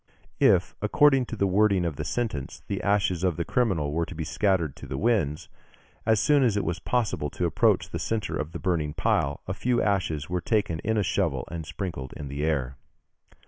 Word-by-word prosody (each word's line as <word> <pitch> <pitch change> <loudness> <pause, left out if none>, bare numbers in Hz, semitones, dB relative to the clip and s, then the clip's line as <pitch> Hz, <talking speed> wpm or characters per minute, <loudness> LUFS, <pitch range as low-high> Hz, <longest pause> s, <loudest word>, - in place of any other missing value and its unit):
If, - - +4
according 135 -4 +4
to - - -5
the 100 - +1
wording 100 -1 +3
of 80 -4 -2
the 75 - -4
sentence, 80 - -3
the 100 - -3
ashes 95 -3 +1
of 90 -4 +1
the 85 - -1
criminal 95 -13 +1
were 80 +2 -1
to 90 - -8
be 80 - -3
scattered 85 -3 0
to - - -9
the 65 - -4
winds, 90 - 0 0.6
as 110 -1 +4
soon 145 +5 +4
as 115 -6 +2
it 100 - 0
was 85 +1 -2
possible 110 -11 -1
to - - -2
approach - - +2
the - - -3
centre 110 -3 -2
of 75 +1 -3
the 85 - -5
burning 80 -5 -1
pile, 70 +1 0
a 90 - -2
few 120 +5 0
ashes 85 -7 0
were 90 0 -2
taken 95 -5 0
in 110 +5 -1
a 105 - +2
shovel 90 - -1
and 80 -2 -5
sprinkled 80 -4 -5
in 70 -2 -6
the 70 +2 -3
air. 70 -4 -1
90 Hz, 210 wpm, -26 LUFS, 75-105 Hz, 0.6 s, If